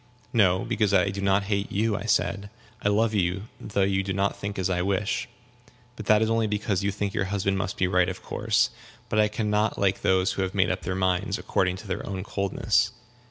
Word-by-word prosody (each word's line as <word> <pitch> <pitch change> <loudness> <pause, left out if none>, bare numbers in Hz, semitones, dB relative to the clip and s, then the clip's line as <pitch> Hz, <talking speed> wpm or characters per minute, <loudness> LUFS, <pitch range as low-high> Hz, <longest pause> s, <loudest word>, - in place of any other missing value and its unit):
"No, 95 -5 +3
because 105 -2 +1
I 95 +1 +4
do 100 0 -4
not 100 0 +2
hate 100 0 -2
you," 105 +1 +1
I 100 - -4
said; 105 -1 0 0.3
"I 105 - +2
love 110 +2 +2
you, 95 -1 0 0.2
though 100 -2 -1
you 95 0 +1
do 95 0 -3
not 100 +1 0
think 100 0 -5
as 95 - 0
I 90 -2 0
wish. 100 +4 -1 0.7
But 110 -3 -8
that 105 +1 +5
is 110 - 0
only 115 -1 +2
because 105 -2 -1
you 100 - +1
think 100 0 -3
your 95 - 0
husband 95 0 -1
must 95 -1 -3
be 95 - +2
right 90 0 +2
of 90 - -7
course. - - +1 0.4
But 110 - +1
I 105 - +5
can 105 0 -2
not 105 +1 +1
like 100 -1 +1
those 95 0 +2
who - - -3
have 95 +1 -2
made 95 -2 +3
up - - -3
their 90 - -3
minds 95 +2 0
according 90 -1 0
to 100 +3 -10
their 95 +1 -3
own 95 -2 -4
coldness." 100 +2 0
100 Hz, 230 wpm, -26 LUFS, 95-105 Hz, 0.7 s, that